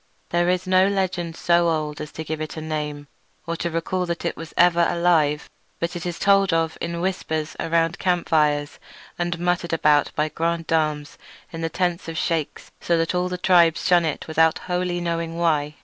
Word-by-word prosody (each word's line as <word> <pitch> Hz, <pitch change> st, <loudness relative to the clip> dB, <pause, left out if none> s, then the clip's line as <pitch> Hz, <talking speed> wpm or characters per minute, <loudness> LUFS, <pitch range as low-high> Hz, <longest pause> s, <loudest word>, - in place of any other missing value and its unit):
There 175 Hz, +1 st, +2 dB
is 180 Hz, +1 st, 0 dB
no 185 Hz, +1 st, +4 dB
legend 185 Hz, -4 st, -1 dB
so 170 Hz, 0 st, +2 dB
old 155 Hz, -2 st, -2 dB
as 150 Hz, -, -7 dB
to 160 Hz, -, -5 dB
give 155 Hz, 0 st, -4 dB
it 155 Hz, +1 st, -5 dB
a -, -, -2 dB
name, 150 Hz, -2 st, -4 dB, 0.4 s
or 170 Hz, -1 st, -3 dB
to 170 Hz, -, -2 dB
recall 175 Hz, +2 st, -2 dB
that 170 Hz, 0 st, -4 dB
it 170 Hz, -, -1 dB
was 165 Hz, 0 st, -9 dB
ever 175 Hz, -1 st, +5 dB
alive; 165 Hz, -4 st, +2 dB, 0.3 s
but 170 Hz, +1 st, -2 dB
it 175 Hz, 0 st, -4 dB
is 175 Hz, -, -4 dB
told 195 Hz, -1 st, +3 dB
of 165 Hz, -1 st, 0 dB
in 170 Hz, 0 st, -3 dB
whispers 160 Hz, -4 st, -2 dB
around 165 Hz, +1 st, 0 dB
campfires 155 Hz, -5 st, +1 dB, 0.4 s
and 175 Hz, -1 st, -1 dB
muttered 175 Hz, 0 st, -1 dB
about 150 Hz, -2 st, +3 dB
by 150 Hz, -, +1 dB
grandams 160 Hz, -3 st, -1 dB, 0.3 s
in 165 Hz, -, -5 dB
the 165 Hz, -, -1 dB
tents 175 Hz, +1 st, -1 dB
of 165 Hz, 0 st, -5 dB
sheiks, 165 Hz, -3 st, -2 dB
so 170 Hz, -, +1 dB
that 165 Hz, +1 st, 0 dB
all 180 Hz, 0 st, 0 dB
the 180 Hz, -, -3 dB
tribes 175 Hz, -3 st, +4 dB
shun 180 Hz, -2 st, +4 dB
it 155 Hz, -3 st, -3 dB
without 160 Hz, 0 st, +3 dB
wholly 180 Hz, -1 st, -1 dB
knowing 165 Hz, -1 st, -2 dB
why. 150 Hz, -3 st, +1 dB
170 Hz, 190 wpm, -23 LUFS, 160-175 Hz, 0.4 s, ever